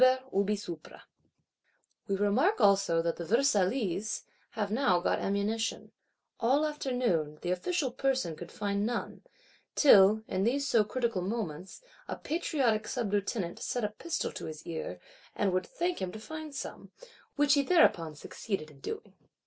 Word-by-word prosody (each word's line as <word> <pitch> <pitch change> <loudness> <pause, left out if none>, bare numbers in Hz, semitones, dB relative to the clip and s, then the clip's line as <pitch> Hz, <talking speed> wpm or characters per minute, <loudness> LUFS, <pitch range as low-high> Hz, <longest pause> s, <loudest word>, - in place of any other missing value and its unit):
We 200 +1 +1 1.6
remark 235 - +2
also 195 -5 +4
that 170 0 -1
the 170 - -4
Versaillese 215 -2 +1 0.3
have 205 -2 -1
now 220 -7 +3
got 175 - 0
ammunition: 210 +3 -1 0.5
all 270 +6 +3
afternoon, 245 - -1
the 175 - -1
official 270 - 0
Person 260 - 0
could 175 +2 -9
find 200 -1 -1
none; 235 +2 -3 0.5
till, 215 -5 +7
in 190 - -1
these 275 +6 +1
so 230 -5 +4
critical 230 -2 -1
moments, 190 - -4 0.2
a - - -3
patriotic 265 -10 0
Sublieutenant 205 -5 -2
set 245 - -2
a 210 - +1
pistol 320 +10 -3
to - - -7
his 155 -1 -8
ear, 165 -2 -5 0.4
and 195 -3 +1
would 185 -1 0
thank 350 +1 -2
him 185 -1 -2
to 220 - -7
find 310 +4 -7
some,—which 290 - -3
he 285 - +5
thereupon 180 - +3
succeeded 155 0 -5
in 140 - -18
doing. - - -6
210 Hz, 140 wpm, -30 LUFS, 185-270 Hz, 1.6 s, till